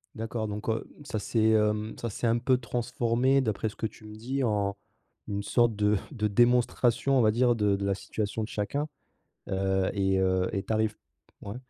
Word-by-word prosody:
D'accord, 110 0 -3
donc, 105 +1 -5
heu, 110 0 0 0.2
mmh, - - -12
ça 110 - -3
s'est, 110 +1 +2
hem, 105 0 +1
ça, 115 - -3
s'est 115 +3 -2
un 115 +1 +3
peu 130 +1 +3
transformé 125 +2 +1
d'après 110 -2 -1
ce - - -14
que - - -3
tu 110 0 -7
me 105 0 -10
dis 130 +5 -2
en 100 -3 0 0.5
une 100 0 -3
sorte 120 +1 +2
de 105 0 +2
de 105 -5 -1
démonstration, 120 +3 +3
on - - +5
va 110 -1 +4
dire 120 +1 +3
de 105 -2 +2
de 100 0 -3
la 100 - +2
situation 105 +2 -3
de - - -4
chacun, 140 +9 -2 0.6
heu, 95 -1 +1
et 95 -1 +1
heu, 95 -1 +2
et 95 - -1
tu - - -3
arrives 110 -1 +1
p - - -50 0.5
ouais, 105 - -5
110 Hz, 210 wpm, -28 LUFS, 100-120 Hz, 0.6 s, on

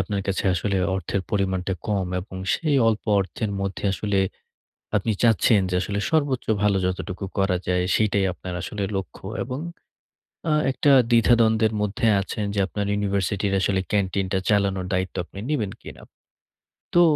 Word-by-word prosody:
আপনার 100 +2 -2
কাছে 95 -1 -1
আসলে 100 +3 -1 0.2
অর্থের 95 +1 -2
পরিমাণটা 95 -2 0 0.2
কম 100 -3 0
এবং 95 0 -10 0.2
সেই 155 -4 +1
অল্প 110 -2 -1 0.2
অর্থের 100 +3 -3
মধ্যে 100 +1 -4
আসলে 100 0 -1 0.8
আপনি 105 +2 +1
চাচ্ছেন 110 -2 +4
যে 90 - -1
আসলে 100 +2 -2
সর্বোচ্চ 145 -5 +1 0.2
ভালো 100 -2 +3
যতটুকু 95 +1 -3
করা 95 -2 +2
যায় 90 0 +1
সেইটাই 105 -2 +2
আপনার 90 0 -7
আসলে 100 +3 -4
লক্ষ্য 95 -3 -5 0.2
এবং 130 +2 -5 0.9
আ - - +3 0.2
একটা 140 +2 +2 0.2
দ্বিধা-দ্বন্দ্বের 115 -2 +4
মধ্যে 105 +4 -1
আছেন 105 +2 -3
যে 100 - +1
আপনার 100 +1 -3
ইউনিভার্সিটির 100 0 0
আসলে 95 0 +1
ক্যান্টিনটা 95 -1 0
চালানোর 100 -3 +1
দায়িত্ব 95 0 -1
আপনি 95 - -13
নিবেন 110 -10 0
কিনা? - - -11 0.9
তো 175 - +6
100 Hz, 145 wpm, -24 LUFS, 95-110 Hz, 0.9 s, তো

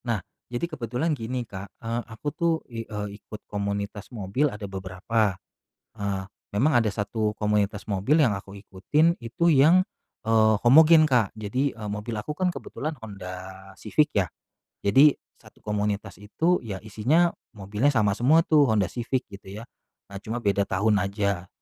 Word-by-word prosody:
Nah 115 -3 0 0.3
jadi 120 +7 -1
kebetulan 140 +1 -2
gini 125 0 -4
Kak, 100 0 -8
eee, 115 +1 -3
aku 110 +6 -8
tuh 170 -1 +1
i 115 -2 -6
eee, 105 -2 -5
ikut 105 - -10
komunitas 100 0 -4
mobil 115 +6 0
ada 105 0 -7
beberapa. 95 +2 -1 0.6
Eee, 100 -2 -2 0.3
memang 135 +6 +3
ada 115 -2 +2
1 105 +1 -2
komunitas 105 -1 0
mobil 105 +12 +3
yang 120 -7 +3
aku 95 0 -12
ikutin 145 - +1
itu 125 +9 +1
yang, 155 +6 +6 0.4
eee, 110 -1 +4
homogen 155 +5 +8
Kak. 120 -7 +2
Jadi, 125 +6 -1
eee, 105 -2 -6
mobil 105 +3 -4
aku 105 +8 -4
kan 185 - +2
kebetulan 155 +3 -5
Honda 95 -4 -7 0.4
Civic 150 +8 +1
ya. 95 -4 +1 0.5
Jadi, 135 +9 +6 0.2
1 - - -19
komunitas 105 -1 -2
itu 165 +12 +1
ya 100 -4 -5
isinya 140 - +2 0.2
mobilnya 105 +7 0
sama 110 -6 +2
semua 150 +9 +4
tuh 150 -2 +5
Honda 105 -5 +2
Civic 125 +2 -2
gitu 100 +1 -9
ya. - - -8 0.5
Nah, 100 - -6
cuma 115 +2 -3
beda 100 -1 +2
tahun 100 +2 +2
aja. 100 -2 -2
110 Hz, 160 wpm, -25 LUFS, 100-130 Hz, 0.6 s, homogen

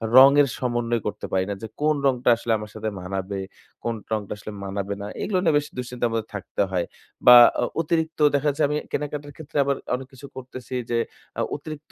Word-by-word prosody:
রঙের 140 +2 +8
সমন্বয় 120 -2 -1
করতে 105 - -4
পারি 95 0 +1
না, 100 - -1
যে 110 - -5
কোন 155 0 +3
রংটা 125 -2 +2
আসলে 115 0 -3
আমার 105 0 -8
সাথে 110 0 -2
মানাবে। 95 +1 -4 0.4
কোন 115 -1 -1 0.2
রংটা 105 -3 -2
আসলে 105 - -8
মানাবে 100 +1 -3
না। 100 - -5
এগুলো 190 -3 0
নিয়ে 160 -4 +3
বেশ 145 0 -1
দুঃশ্চিন্তার 125 -1 -2
মধ্যে 115 -1 -2
থাকতে 100 0 -3
হয়। 90 -2 0 0.4
বা 125 - +12 0.3
অ - - +3 0.2
অতিরিক্ত 160 0 -1 0.2
দেখা 145 +1 +1
যাচ্ছে 145 +2 0
আমি 150 - -1
কেনাকাটার 145 0 -4
ক্ষেত্রে 150 -2 -7
আবার 140 0 +1 0.2
অনেক 130 0 -7
কিছু 130 +2 -11
করতেছি 130 0 -7 0.2
যে 120 - +2 0.4
আ - - +2
অতিরিক্ত 155 0 -9
125 Hz, 195 wpm, -24 LUFS, 105-145 Hz, 0.4 s, বা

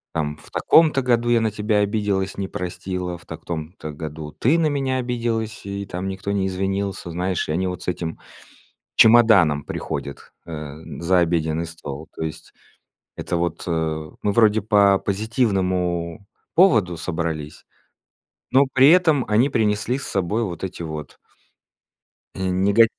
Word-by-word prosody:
Там 75 -2 -2
в - - -15
таком-то 155 -4 +4
году 120 -1 +2
я 120 -1 +4
на 110 -1 0
тебя 105 +1 0
обиделась, 100 -2 0
не 95 -1 -2
простила, 90 -1 -4
в - - -19
так - - -9
том-то 80 -1 -5
году 75 0 -7
ты 145 +8 +2
на 165 - +2
меня 135 -3 0
обиделась 115 -4 -2
и 100 0 -4
там 90 +1 -5
никто 95 +1 -4
не 95 -1 0
извинился. 95 -1 -2
Знаешь, 90 +1 -1
и - - -2
они 90 +4 0
вот 90 -1 -5
с - - -11
этим 85 -2 -3 0.8
чемоданом 110 -11 +6
приходят, 70 0 -6
э, 75 -3 -7 0.2
за 90 +2 +3
обеденный 80 -1 0
стол. 80 -2 -8
То - - -4
есть 80 - -7 0.6
это 90 - -3
вот, 85 -1 -2
э, 80 -2 -2
мы 105 - +1
вроде 110 -1 +4
по 100 -2 +4
позитивному 95 -5 -1 0.3
поводу 110 - +4
собрались, 80 -3 -4 0.9
но 135 +2 +5
при 135 +1 +6
этом 160 -7 +4
они 115 +6 +3
принесли 110 +2 0
с 140 - -5
собой 100 +4 0
вот 90 -4 -5
эти 90 -2 -5
вот 75 -2 -7 1.2
и - - -6
нега 100 +5 +5
95 Hz, 150 wpm, -22 LUFS, 85-110 Hz, 1.2 s, чемоданом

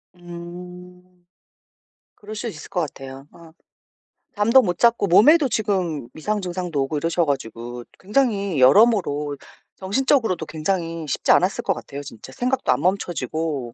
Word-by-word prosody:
음. 180 +1 -11 0.9
그럴 215 +1 -10
수 225 +3 -4
있을 220 - -8
것 180 -3 -1
같아요. 135 -2 -8
어. 165 -1 -16 0.8
잠도 230 +5 +5
못 175 -6 -2
잤고 235 -3 +3
몸에도 275 - +6
지금 185 - -1
이상 210 +7 -2
증상도 175 -5 -3
오고 150 +3 -3
이러셔 165 +2 0
가지고 120 -3 -4 0.2
굉장히 200 - 0
여러모로 145 - +4 0.4
정신적으로도 220 - 0
굉장히 165 0 -3
쉽지 140 - +1
않았을 185 +2 +2
것 195 - +1
같아요. 140 -4 -8
진짜 130 -1 -11
생각도 255 - 0
안 125 - +1
멈춰지고 160 -8 -2
175 Hz, 300 characters per minute, -22 LUFS, 150-205 Hz, 0.9 s, 몸에도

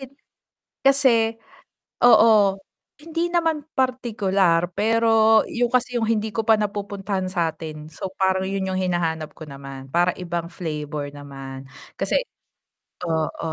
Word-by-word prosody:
Hin 270 0 -10 0.7
kasi, 245 -5 +4 0.7
oo, 215 -4 +6 0.4
hindi 330 +2 -2
naman 325 -3 +1 0.2
partikular. 200 -9 +1
Pero 225 0 +4
'yon 240 0 -1
kasi 250 0 +1
'yong 225 -2 0
hindi 220 -1 0
ko 225 - 0
pa 220 0 +4
napupuntahan 200 -2 -3
sa'tin. 160 -3 -3
So 185 +4 -6
parang 190 0 +1
'yon 195 -1 -2
'yong 185 0 -1
hinahanap 165 -4 -1
ko 160 - -9
naman, 135 -1 -9
parang 175 +1 +2
ibang 170 -1 -4
flavor 150 -4 -4
naman 135 -2 -9 0.3
kasi - - +1 0.8
oo. 160 0 -2
195 Hz, 125 wpm, -23 LUFS, 165-225 Hz, 0.8 s, oo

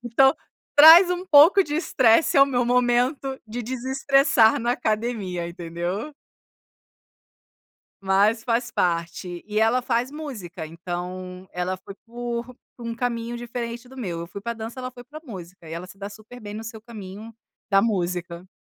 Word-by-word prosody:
Então 255 +3 +4 0.4
traz 325 +5 +10
um 360 0 -2
pouco 335 +4 +7
de 295 - -4
estresse 260 -4 +3
ao 275 0 +7
meu 245 -3 0
momento 250 +3 +1
de 235 +3 -5
desestressar 260 -1 +2
na 240 +1 +1
academia, 215 -7 -2
entendeu? 175 - -5 1.9
Mas 200 +4 +2
faz 240 0 0
parte, 170 +1 -2
e 210 0 -1
ela 225 +3 +3
faz 245 +1 -1
música. 215 - -7
Então 180 +3 -7
ela 180 +1 -3
foi 195 +1 -12
por 240 +1 -5 0.2
por 240 - -9
um 230 - -3
caminho 235 -1 -3
diferente 240 0 -6
do 265 - -14
meu, 180 -9 -4
eu 170 - -6
fui 180 - -8
para 235 +4 -4
dança 225 +2 -7
ela 255 0 -5
foi 245 -1 -12
para 295 +5 -11
música, 180 - -10
e 160 - -7
ela 170 +2 -6
se 190 - -14
dá 200 0 -6
super 220 +4 -13
bem 205 -3 -8
no 220 +1 -6
seu 225 0 -8
caminho 215 -1 -10 0.4
da 195 0 +5
música. 180 -4 -2
230 Hz, 160 wpm, -24 LUFS, 185-250 Hz, 1.9 s, traz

